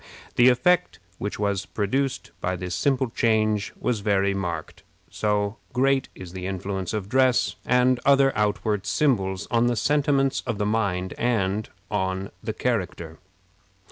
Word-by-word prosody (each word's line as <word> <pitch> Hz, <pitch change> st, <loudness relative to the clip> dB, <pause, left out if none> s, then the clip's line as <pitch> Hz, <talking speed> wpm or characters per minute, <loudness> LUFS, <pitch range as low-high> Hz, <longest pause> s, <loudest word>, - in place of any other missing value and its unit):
The 120 Hz, +1 st, +7 dB
effect 180 Hz, +8 st, +2 dB, 0.2 s
which 105 Hz, -, -3 dB
was 100 Hz, -2 st, -1 dB
produced 130 Hz, +6 st, -1 dB
by 90 Hz, +1 st, -1 dB
this 90 Hz, 0 st, -5 dB
simple 130 Hz, +5 st, +1 dB
change 110 Hz, -3 st, +1 dB
was 120 Hz, -3 st, 0 dB
very 100 Hz, -1 st, +1 dB
marked 85 Hz, -5 st, -4 dB, 0.3 s
so 105 Hz, 0 st, 0 dB, 0.2 s
great 135 Hz, +1 st, +2 dB
is 90 Hz, -2 st, -10 dB
the 95 Hz, 0 st, -5 dB
influence 95 Hz, -1 st, -3 dB
of 105 Hz, -3 st, -3 dB
dress 130 Hz, +2 st, +2 dB
and 125 Hz, 0 st, +3 dB
other 135 Hz, -1 st, +4 dB
outward 105 Hz, -1 st, 0 dB
symbols 100 Hz, -9 st, +1 dB
on 120 Hz, 0 st, +3 dB
the 120 Hz, -, +1 dB
sentiments 140 Hz, +2 st, +2 dB
of 115 Hz, -3 st, -1 dB
the 105 Hz, -, -1 dB
mind 100 Hz, -4 st, 0 dB
and 110 Hz, -3 st, 0 dB, 0.2 s
on 95 Hz, -1 st, -2 dB
the 110 Hz, -, -3 dB
character. 90 Hz, -9 st, -3 dB
105 Hz, 140 wpm, -25 LUFS, 95-125 Hz, 0.3 s, The